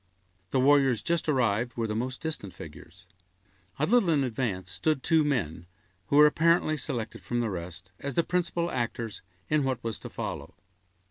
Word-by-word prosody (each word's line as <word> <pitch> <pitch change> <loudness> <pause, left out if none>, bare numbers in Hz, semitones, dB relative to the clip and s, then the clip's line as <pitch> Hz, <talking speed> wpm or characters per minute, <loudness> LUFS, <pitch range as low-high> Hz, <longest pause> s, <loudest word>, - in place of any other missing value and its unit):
The 135 - +1
warriors 135 -4 +4
just 170 -2 0
arrived 120 -3 +1
were 115 - 0
the 105 -1 -2
most 125 +3 -3
distant 150 - -4
figures. 80 +3 -12 0.7
A 150 - +2
little 215 -1 +3
in 150 -4 +3
advance 110 -7 -2
stood 155 +2 0
two 160 -1 +4
men, 90 - -1 0.4
who - - 0
were 150 - +9
apparently 160 +1 +3
selected 125 -7 -3
from 120 - -2
the 115 -3 -1
rest, 90 +1 -7
as 140 -2 -5
the 170 - +3
principal 175 -1 -1
actors 115 -2 -3 0.3
in 150 -1 +2
what 130 -3 -2
was 115 -3 -3
to - - -8
follow. - - -6
130 Hz, 175 wpm, -28 LUFS, 110-155 Hz, 0.7 s, were